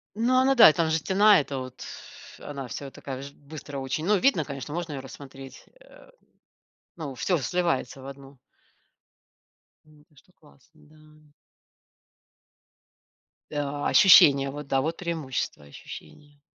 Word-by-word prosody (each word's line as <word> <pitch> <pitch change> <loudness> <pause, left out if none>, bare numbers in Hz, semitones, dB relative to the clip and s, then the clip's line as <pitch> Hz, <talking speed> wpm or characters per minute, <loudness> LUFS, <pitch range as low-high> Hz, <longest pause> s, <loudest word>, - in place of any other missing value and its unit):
Ну, 240 +4 +1
она 265 +1 +3
да, 225 -9 +9
там 160 +1 0
же 160 - +1
стена, 200 +4 +4
это 140 -1 -5
вот. 130 0 -8 0.5
Она 140 -3 -8
вся 135 +4 -7
такая 130 -1 -8
ж 140 0 -10
быстро 145 0 -10
очень, 135 +4 -3
но 210 +2 +3
видно, 185 - +2
конечно, 140 -1 -7
можно 170 -2 -4
ее 140 - -5
рассмотреть, 135 0 -12 0.2
э, - - -19 0.9
но 150 -6 -7
всё 180 +7 0
сливается 140 -2 -2
в 130 - -10
одну. 135 -1 -12 1.5
М, 150 -1 -22
конечно 150 +4 -26
классно, 155 +1 -24
да. 155 0 -22 2.2
Да. 145 -1 -3
Ощущения, 140 -9 +7
вот 145 0 -8
да, 135 -1 +1
вот 160 +4 -2
преимущество- 160 - -4
ощущения. 145 - -13
145 Hz, 135 wpm, -26 LUFS, 135-165 Hz, 2.2 s, да